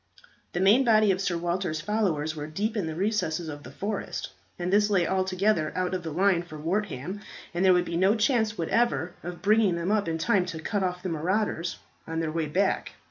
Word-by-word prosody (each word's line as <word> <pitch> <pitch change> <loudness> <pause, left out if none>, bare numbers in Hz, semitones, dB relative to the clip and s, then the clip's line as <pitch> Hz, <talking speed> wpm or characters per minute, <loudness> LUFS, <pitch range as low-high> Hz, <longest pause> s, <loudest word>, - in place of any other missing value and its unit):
The 175 - -1
main 205 +8 +5
body 215 -4 +5
of 190 0 -1
Sir 180 -3 0
Walter's 175 -1 -1
followers 160 -5 0
were 150 -1 -5
deep 205 +9 -2
in 200 -7 -1
the 160 - -4
recesses 175 -4 -1
of 145 -1 -7
the - - -10
forest, 205 0 -4 0.3
and 180 +2 -2
this 205 +1 +4
lay 190 -4 +3
altogether 190 -2 +1
out 185 0 -1
of 185 - -1
the 165 - -5
line 180 +2 +2
for 165 -3 -10
Wortham, 185 +1 -2 0.3
and 175 +2 0
there 190 - +6
would 180 0 +2
be 170 - -2
no 190 +4 +4
chance 220 -1 +1
whatever 180 -1 +1
of 175 0 -7
bringing 210 -3 +4
them 170 +3 -1
up 210 -4 +1
in 165 0 -1
time 180 +2 +2
to 165 -3 -5
cut 200 +5 -2
off 180 -1 -2
the 185 - -2
marauders 175 +1 -1 0.3
on 165 0 -2
their 160 -1 -1
way 160 -1 -1
back. 190 +6 0
185 Hz, 215 wpm, -27 LUFS, 165-205 Hz, 0.3 s, there